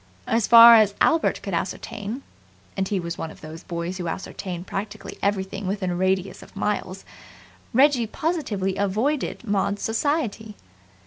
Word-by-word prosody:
As 225 -1 +1
far 235 0 +10
as 215 -3 +5
Albert 325 0 +2
could - - -5
ascertain 220 +5 -4 0.5
and 190 0 -1
he 200 -1 -1
was 170 -1 -5
one 165 - -4
of - - -14
those 160 +2 -9
boys 175 +1 -5
who 175 - -3
ascertain 180 0 -5
practically 200 +1 -6
everything 195 -1 -2
within 190 -2 -2
a - - -2
radius 190 +1 -1
of - - -15
miles 195 -2 -3 0.7
Reggie 260 -2 +4
positively 220 - -2
avoided 220 +12 -1
Maud's 200 0 0
society. 225 -3 -1
200 Hz, 145 wpm, -24 LUFS, 190-230 Hz, 0.7 s, far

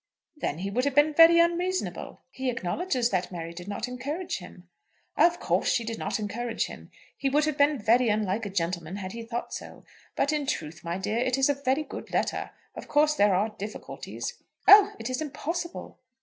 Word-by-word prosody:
"Then 225 - -3
he 195 +3 -4
would 250 +5 0
have 285 -2 0
been 295 +1 +5
very 330 +2 +8
unreasonable." 345 +2 0
"He 265 -1 -3
acknowledges 245 - -1
that 185 -1 -1
Mary 170 -1 -6
did 175 +2 -9
not 205 +3 -3
encourage 280 - -4
him." 180 0 -13 0.5
"Of 345 0 +4
course - - 0
she 235 - +1
did 225 0 -5
not - - -1
encourage 225 +3 -2
him. - - -10 0.3
He 275 - -1
would 295 +2 +3
have 310 -2 -1
been 290 +1 +3
very 235 +2 +3
unlike 210 0 0
a - - -5
gentleman 170 -2 -2
had 190 -2 -5
he 230 - -6
thought 230 +1 -5
so. - - -8 0.3
But 285 - +1
in 295 -2 -1
truth, 160 - -4
my 170 +1 -3
dear, 210 +4 -1
it 255 +1 +1
is 270 +1 +3
a - - +4
very 280 +1 0
good - - -9
letter. - - -1 0.2
Of - - -9
course 300 +1 +3
there 205 -8 +3
are 205 +4 +1
difficulties." 215 - -6 0.3
"Oh; 405 0 +9
it - - -5
is 255 +3 -2
impossible!" 330 +4 -5
250 Hz, 200 wpm, -27 LUFS, 200-300 Hz, 0.5 s, Oh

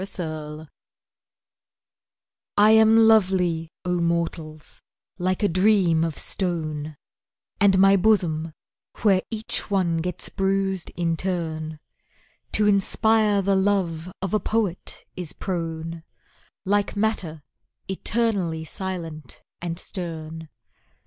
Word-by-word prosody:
Beauty 155 -4 -6 1.9
I 210 +1 +7
am 220 0 +6
lovely, 180 -6 +3 0.2
O 180 0 0
mortals, 165 -2 -3 0.4
like 185 +3 0
a - - +5
dream 185 -3 +3
of 165 -3 -2
stone, 155 -5 -2 0.6
And 195 -2 +5
my 195 +1 +6
bosom, 170 -6 +2 0.5
where 195 -4 +4
each 220 0 -3
one 185 -4 +1
gets 175 +1 -3
bruised 195 -1 -1
in 165 -1 0
turn, 160 -3 -3 0.8
To 210 - +2
inspire 210 +1 +3
the 195 +1 +2
love 185 -4 0
of 195 - -2
a 215 - +3
poet 210 -6 -2
is 180 -4 -5
prone, 165 -2 -4 0.6
Like 205 +2 +1
matter 195 -8 -1 0.4
eternally 190 -5 -1
silent 165 -6 -6 0.2
and 170 -1 -4
stern. 160 -4 -6
180 Hz, 105 wpm, -24 LUFS, 160-200 Hz, 1.9 s, I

